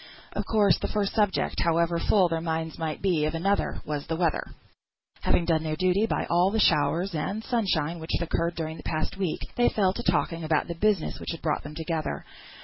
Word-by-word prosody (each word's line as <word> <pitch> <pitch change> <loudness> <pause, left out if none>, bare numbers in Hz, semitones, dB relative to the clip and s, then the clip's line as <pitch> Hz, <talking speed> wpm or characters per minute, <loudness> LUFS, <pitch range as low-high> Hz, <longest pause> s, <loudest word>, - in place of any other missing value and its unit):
Of - - -3
course, 210 -4 +4
the - - -2
first 205 -2 -1
subject, 210 -3 +1
however 170 0 +2
full 190 +1 +4
their 165 -1 -2
minds 160 -1 -3
might 160 +1 -3
be 170 -6 +2
of 155 +2 -1
another, 195 +5 0
was 150 -2 -4
the 165 - -1
weather. 165 -2 +1 0.8
Having 170 - +2
done 165 -2 +2
their 155 -1 -2
duty 185 +5 +2
by - - -1
all 175 +2 +3
the 220 +2 0
showers 165 +2 +2
and 195 +8 -2
sunshine 180 - 0
which 160 - -8
had 170 - -2
occurred 170 +1 0
during 160 -1 -4
the - - -9
past 155 +4 -2
week, 185 -5 -2 0.2
they 240 - +4
fell 190 -3 +2
to 240 - -4
talking 165 -7 0
about 155 -1 +1
the 170 - -3
business 200 0 0
which 165 - -5
brought 155 -2 0
them 150 +1 -9
together. 160 -1 -3
170 Hz, 210 wpm, -27 LUFS, 160-195 Hz, 0.8 s, course